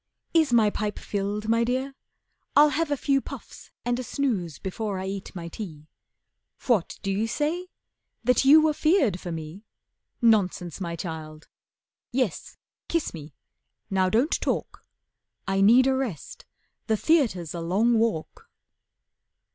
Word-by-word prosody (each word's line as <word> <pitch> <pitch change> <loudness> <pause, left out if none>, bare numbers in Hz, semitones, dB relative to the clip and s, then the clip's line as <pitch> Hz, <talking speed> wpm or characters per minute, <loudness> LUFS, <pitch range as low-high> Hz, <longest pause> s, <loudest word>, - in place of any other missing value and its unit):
Is 320 -5 +4
my 220 -3 +4
pipe 210 0 -3
filled, 205 +1 -3
my 230 +1 +3
Dear? 260 +3 -1 0.6
I'll 295 +1 +7
have 325 +1 -1
a 290 - 0
few 275 0 +1
Puffs - - -10 0.2
and 245 0 0
a - - -3
snooze 220 - -2
before 200 +1 -4
I 185 - -4
eat 195 0 -6
my 170 -2 -6
tea. 165 -5 -8 0.8
What 225 -9 +1
do 195 - -1
you 210 +4 0
say? 315 +9 -1 0.6
That 250 +3 +3
you 300 +3 +7
were 310 -1 +3
feared 295 - +2
for 175 - -6
me? 160 +4 -7 0.6
Nonsense, 195 - +2
my 170 -2 -3
child. 155 -2 -7 0.6
Yes, 245 -8 -2 0.3
kiss 335 -2 -1
me, 150 -3 -10 0.6
now 190 -1 +2
don't 240 - +1
talk. - - -2 0.6
I 195 0 +1
need 235 +6 +6
a 265 - +3
rest, 245 - -4 0.4
the 220 -1 +2
theatre's 215 - +1
a 170 - -4
long 215 +7 +2
walk." 220 -9 -2
215 Hz, 145 wpm, -26 LUFS, 180-265 Hz, 0.8 s, I'll